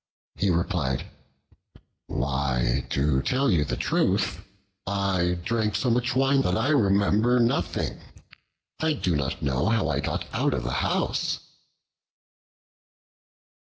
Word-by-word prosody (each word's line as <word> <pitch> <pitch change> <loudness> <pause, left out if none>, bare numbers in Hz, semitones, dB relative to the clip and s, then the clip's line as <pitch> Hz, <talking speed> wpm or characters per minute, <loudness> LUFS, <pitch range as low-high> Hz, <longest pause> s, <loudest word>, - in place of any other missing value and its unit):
He 100 - 0
replied, 85 -6 0 1.0
"Why, 65 -1 -1
to 70 -1 +1
tell 135 - +1
you 80 -5 +3
the 70 - -3
truth, - - +1 0.5
I 95 -3 0
drank 110 0 0
so 110 +5 +1
much 120 +1 0
wine 135 +1 +3
that 90 -7 0
I 115 +6 +1
remember 105 -1 +3
nothing. 90 -8 0 0.8
I 160 0 +1
do 90 - -1
not 70 -2 -2
know 65 +2 0
how 115 0 +1
I - - 0
got - - -2
out - - +1
of - - -3
the - - -3
house." - - -1
95 Hz, 120 wpm, -26 LUFS, 70-115 Hz, 1.0 s, you